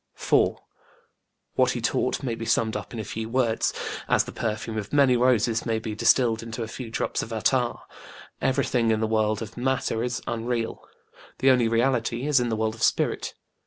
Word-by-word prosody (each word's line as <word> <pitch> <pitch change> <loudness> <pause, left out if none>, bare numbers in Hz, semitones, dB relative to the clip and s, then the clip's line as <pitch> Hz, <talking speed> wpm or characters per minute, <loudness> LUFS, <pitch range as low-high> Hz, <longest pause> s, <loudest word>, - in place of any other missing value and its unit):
4. - - +2 0.9
What - - +3
he - - -3
taught - - 0
may 125 -3 -1
be 115 0 -5
summed 115 -1 +1
up - - -5
in 115 - -6
a - - -3
few 110 +2 -5
words, 115 -2 +1 0.4
as - - +4
the - - -8
perfume 110 0 -3
of 105 -2 -4
many 140 -3 +4
roses 120 -2 +2
may 115 -2 0
be 110 -1 -4
distilled 115 +1 +3
into 115 0 -5
a - - -5
few 115 +1 -7
drops 110 - -1
of 115 - -7
attar: 120 +2 +1 0.7
Everything 130 -3 +1
in 110 -1 +2
the 110 - +1
world 110 0 +1
of 110 +1 -10
Matter 125 -3 0
is 125 0 -2
unreal; 115 0 -2 0.5
the 135 - +5
only 125 -3 +3
reality 120 +1 +1
is 145 -2 +4
in 120 -1 0
the 110 - 0
world 110 0 -1
of 110 - -12
Spirit. - - +1
115 Hz, 195 wpm, -25 LUFS, 110-125 Hz, 0.9 s, the